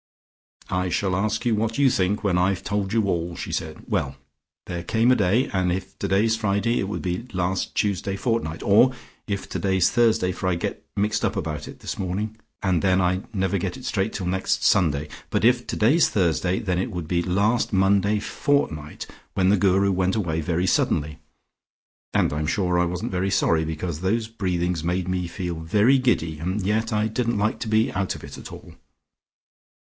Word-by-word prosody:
"I 90 0 0
shall 95 +1 0
ask 110 +4 -1
you 120 - +3
what 110 +1 -1
you 140 -1 +5
think 100 +2 0
when 100 -3 +2
I've 90 +1 +1
told 100 0 -2
you 110 0 +2
all," 85 -2 -1
she - - -6
said. - - -4
"Well! 70 -1 -1 0.5
There 85 0 -4
came 115 +7 +2
a - - +6
day, 110 +5 +2
and 90 -2 +1
if 95 +2 -5
today's 110 +4 +2
Friday 110 +1 0
it 95 - -1
would 105 - -4
be 90 +6 -3
last 95 0 -1
Tuesday 100 -1 0
fortnight, 115 -8 -2
and 120 +6 +5 0.3
if 100 -2 -3
today's 95 -2 +1
Thursday, 115 -6 +3
for 95 - -4
I 90 - +1
get 85 - -4
mixed 105 +1 0
about 80 -7 -2
it - - -11
this - - -5
morning, 100 +4 -3 0.3
and 95 -4 +2
then 95 -1 +3
I 90 +1 +1
never 95 -1 0
get 95 +7 -3
it 130 - -10
straight 110 -5 0
till 95 - -4
next 95 +1 0
Sunday, 75 -6 +3 0.2
but - - +1
if 125 0 +3
today's 145 +10 +3
Thursday, 90 -1 +1
then 95 -6 -1
it 110 - -1
would 90 -6 -5
be 85 0 +1
last 100 +7 +1
Monday 100 +1 +3
fortnight, 95 - -1 0.3
when 95 -1 +3
the 100 - +5
Guru 95 +1 +3
went 95 0 +1
away 85 -7 -1
very 85 +3 0
suddenly, 75 -4 0 0.9
and - - +1
I'm 75 +1 -2
sure 90 0 +1
I 90 - +3
wasn't 90 +1 -3
very 95 +1 0
sorry, 80 -4 +2
because 80 +1 -4
those 110 +4 0
breathings 90 -6 -2
made 90 +1 -1
me 90 -1 -1
feel 85 -1 -4
very 105 +11 +3
giddy 85 -12 0
and 90 +6 -2
yet 110 +4 0
I 105 0 +1
didn't 115 0 -1
like 110 +2 0
to 120 - -4
be 110 +1 +2
out 95 -1 -1
of - - -11
it - - -9
all. - - -11
95 Hz, 190 wpm, -24 LUFS, 90-110 Hz, 0.9 s, a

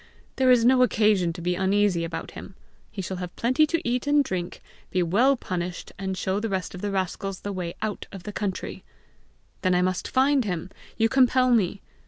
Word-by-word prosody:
There 260 -1 +3
is 245 -2 +5
no 255 +1 +5
occasion 210 -7 +3
to 170 0 -8
be 180 +1 +1
uneasy 190 -1 +2
about 165 0 -5
him! 190 - -10 0.3
He 195 - -6
shall 185 +1 -4
have 180 -1 -6
plenty 255 +6 +3
to 335 +2 -1
eat 245 +2 -1
and 290 0 +4
drink, 180 -7 -4 0.3
be 185 -1 +1
well 240 +11 +3
punished, 180 -3 -5
and 190 -1 -3
show 190 +2 -1
the 225 +1 -2
rest 190 -2 -3
of 180 - -8
the 205 - -2
rascals 195 0 -3
the 205 - -4
way 175 -2 -4
out 215 -1 -3
of 195 -3 -9
the 210 - -7
country!" 200 -3 -4 0.8
"Then 185 -1 +2
I 180 - +3
must 185 0 -1
find 270 +1 +3
him! 180 -3 -4 0.3
You 225 - +4
compel 255 0 +3
me!" 200 -4 +2
195 Hz, 205 wpm, -25 LUFS, 180-245 Hz, 0.8 s, is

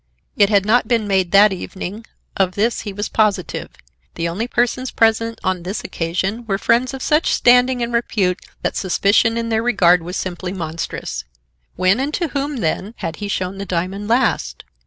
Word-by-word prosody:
It 200 -1 +4
had 200 -2 +3
not 235 +4 +3
been 230 -3 +1
made 190 -3 +1
that 200 +2 +6
evening. 195 +3 -7 0.3
Of 185 -2 +1
this 225 +3 0
he 205 - -5
was 205 +2 -3
positive. 210 -4 0 0.5
The 165 - -1
only 195 +8 -3
persons 245 +1 0
present 225 0 +1
on 185 -2 0
this 185 +5 -4
occasion 185 +7 -2
were 195 -2 0
friends 240 +6 +1
of 265 - -6
such 305 +1 +2
standing 245 0 +4
and 235 0 -3
repute 200 -6 0 0.2
that - - -1
suspicion 205 +4 +2
in 230 0 -2
their 220 -1 +1
regard 185 -7 +4
was 180 +3 -5
simply 180 0 -4
monstrous. 165 - -5 0.5
When 185 +5 +2
and 275 +3 -1
to 340 -3 -1
whom, 280 0 -2
then, 190 +6 -2
had 165 -1 -5
he 205 - -5
shown 190 -1 -3
the - - -3
diamond 185 +4 -2
last? 240 +3 0
205 Hz, 180 wpm, -19 LUFS, 185-235 Hz, 0.5 s, that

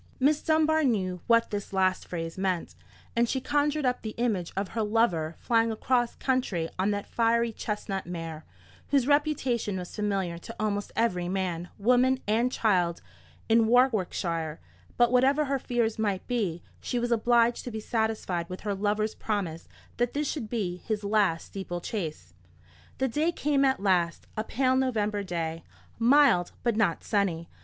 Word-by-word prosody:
Miss 290 +3 +3
Dunbar 315 0 +3
knew 185 -9 0
what 230 -1 +4
this 205 -1 -4
last 185 -1 +1
phrase 165 -2 -4
meant, 185 -2 -1 0.4
and 235 0 +2
she 265 - 0
conjured 290 +2 0
up 250 0 +1
the 215 -1 -6
image 215 -8 -1
of 195 -1 -1
her 225 - -2
lover 210 -8 +1
flying 230 -1 +2
across 240 +2 0
country 250 -11 0
on 190 +2 +2
that 205 -1 -2
fiery 235 0 +1
chestnut 205 -3 -4
mare, 165 -3 -6 0.4
whose 275 -3 +2
reputation 270 -8 +1
was 180 -1 -7
familiar 195 -5 -1
to 230 +6 -9
almost 205 -1 -1
every 180 -6 0
man, 180 -2 -2
woman, 250 +4 +3
and 230 +4 +2
child 180 -8 +1 0.4
in 225 0 +4
Warwickshire: 185 - +1 0.4
but 240 0 +4
whatever 270 +4 +4
her 275 0 -1
fears 235 -3 -1
might 205 -4 -1
be, 200 -9 -2 0.2
she 245 - -3
was 240 0 -1
obliged 235 +1 +3
to - - -3
be 220 -2 -5
satisfied 215 -6 -1
with 185 - -7
her 205 -1 -2
lover's 210 +2 0
promise 185 -7 -3 0.3
that 240 0 0
this 295 0 -1
should 240 -9 -4
be 195 -7 -2
his 210 +2 -3
last 200 -5 +1
steeple 190 -3 -5
chase. 155 - -5 0.6
The 265 - +1
day 300 +7 +1
came 290 -4 +1
at 265 -1 +2
last, 180 -4 +1
a 215 - -1
pale 255 +3 +1
November 215 -6 0
day, 165 -3 -3 0.4
mild 240 -7 +4
but 235 -3 +1
not 200 -7 +1
sunny. 180 -6 0
215 Hz, 165 wpm, -28 LUFS, 185-245 Hz, 0.6 s, what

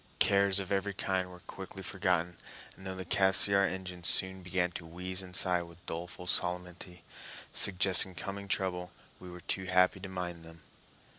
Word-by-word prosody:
Cares 100 -1 +5
of 95 0 -6
every 100 0 0
kind 95 -1 -1
were 90 -1 -13
quickly 95 +1 -9
forgotten, 90 -3 0 0.4
and 95 - -10
though 95 - -4
the 95 0 -6
Cassiar 100 +1 +5
engines 90 -1 -6
soon 95 0 +1
began 90 -1 -1
to 85 - -7
wheeze 90 +3 -3
and 90 -1 -9
sigh 90 -2 +3
with 85 +1 -13
doleful 90 +2 -6
solemnity, 90 0 -3 0.5
suggesting 95 -1 +3
coming 100 +2 -6
trouble, 90 -2 -2 0.3
we 90 - -10
were 90 0 -10
too 95 +2 -3
happy 90 +1 +3
to 95 +1 -7
mind 90 -2 -5
them. 80 -1 -14
90 Hz, 165 wpm, -31 LUFS, 90-95 Hz, 0.5 s, Cares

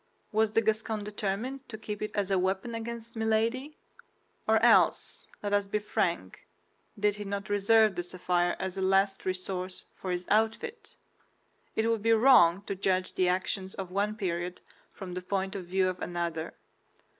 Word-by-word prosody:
Was 215 0 +2
the 225 - +4
Gascon 220 -1 -1
determined 210 +6 -4
to 220 - -6
keep 210 -1 -6
it 215 - -2
as 200 -2 0
a 190 - +3
weapon 190 +5 -1
against 230 0 -6
Milady, 225 +6 0 0.7
or - - +5
else, - - +3 0.2
let 205 0 -1
us 205 -1 +2
be 205 - 0
frank, 175 - -2 0.5
did 210 0 +2
he 210 - -5
not 200 0 -4
reserve 210 +1 +4
the 175 - -1
sapphire 175 0 0
as 190 0 -4
a - - -2
last 195 +1 +2
resource 185 0 -4
for 190 - -7
his 180 0 -2
outfit? 225 - 0 0.8
It 220 +1 +1
would 230 -2 +1
be 230 +1 +4
wrong 215 -7 +6
to 200 - -3
judge 185 -1 0
the 185 - +2
actions 190 +1 -2
of 190 -2 -6
one 205 +2 0
period 180 -3 -3 0.3
from 185 -3 -8
the 180 - -4
point 190 +1 -2
of 190 -3 -5
view 185 +1 +2
of 185 0 -3
another. 170 -2 -3
200 Hz, 170 wpm, -29 LUFS, 185-220 Hz, 0.8 s, wrong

